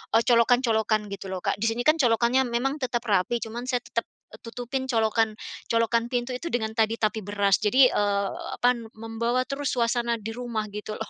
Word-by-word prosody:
eee, 230 - +5
colokan-colokan 230 -3 +2
gitu 195 0 -6
loh, 185 -1 -5
Kak. - - -1
Di 225 - +1
sini 230 +2 -1
kan 310 +3 +3
colokannya 245 +1 +3
memang 270 +5 -1
tetap 245 -2 -2
rapi 205 +5 +1
cuman 235 +3 -6
saya 245 -2 -1
tetep 230 - -3 0.2
e 215 - -12
tutupin 245 +3 -4
colokan 225 -2 +1 0.3
-colokan 230 0 +1
pintu 245 0 -2
itu 335 - -6
dengan 220 -2 0
tadi 225 0 +3
tapi 215 +1 +1
beras 200 -1 +2
jadi, 255 +5 +5
eee, 200 -1 +1 0.3
apa, 245 0 +5
n 230 - -9
membawa 225 +3 -1
terus 275 +1 -3
suasana 235 0 +1
di 225 +2 -5
rumah 235 -2 -3
gitu 210 +1 -6
loh. 220 - -6
230 Hz, 195 wpm, -26 LUFS, 220-245 Hz, 0.3 s, eee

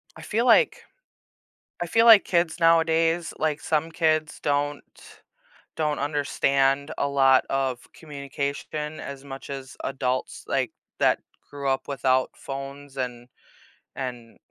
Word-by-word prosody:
I - - -11
feel 230 +3 -1
like 470 - +5 1.0
I - - 0
feel 225 +7 +3
like 220 -3 +9
kids 170 -1 +1
nowadays, 165 0 +3
like, 155 -1 0
some 160 +1 0
kids 155 -2 0
don't 145 0 0 0.9
don't 150 -2 0
understand 140 -1 +1
a 140 - +1
lot 135 -2 +4
of 135 -2 0
communication 145 +1 -5
as 140 -1 -7
much 135 -1 -9
as 135 -1 -7
adults, 130 -1 -2
like, - - 0 0.3
that - - +3 0.3
grew 140 -1 -5
up 135 0 -1
without 130 -2 +1
phones 140 0 -8
and 125 -2 -4 0.7
and 125 -3 -6
140 Hz, 125 wpm, -25 LUFS, 135-160 Hz, 1.0 s, like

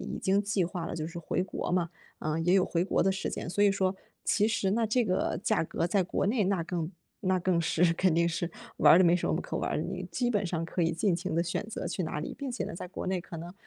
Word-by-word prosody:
已 - - -3
经 195 +2 +2
计 200 -3 0
划 170 -1 -4
了 - - -4
就 155 -2 -3
是 170 +1 -7
回 175 +2 -1
国 190 - -4
嘛， 175 -1 +1 0.3
嗯， 155 +1 -1
也 180 +2 +3
有 185 - +4
回 170 0 0
国 190 - +1
的 190 - +3
时 195 - -2
间， - - -5
所 205 +4 +1
以 205 - +6
说 195 -1 0 0.3
其 210 +1 +3
实 205 -4 +1
呢 225 +1 +1
这 240 +1 +2
个 185 -3 0
价 215 -6 +2
格 165 - -2
在 195 +2 +2
国 180 - -1
内 210 0 +2
那 190 -3 +1
更 170 0 -3 0.3
那 185 -1 +1
更 175 -1 +2
是 165 +1 +3
肯 180 0 +2
定 170 0 +3
是 170 +1 -2 0.3
玩 150 0 +7
儿 - - +8
的 185 - +6
没 170 0 +5
什 180 - -1
么 - - +1
可 - - -5
玩 - - -1
儿 - - -1
的， - - -1
你 - - -4
基 245 -1 0
本 205 -2 +1
上 165 -2 -2
可 175 +1 -2
以 165 0 +2
尽 170 +2 +1
情 175 -1 -3
地 170 - +2
选 170 - -2
择 - - -4
去 - - -2
哪 160 -3 -3
里。 150 - -5
并 280 -2 -5
且 245 - -3
呢， - - -5
在 180 - -6
国 190 - -6
内 185 -1 -1
可 170 -1 -9
能， 170 +3 -7
180 Hz, 310 characters per minute, -29 LUFS, 170-195 Hz, 0.3 s, 儿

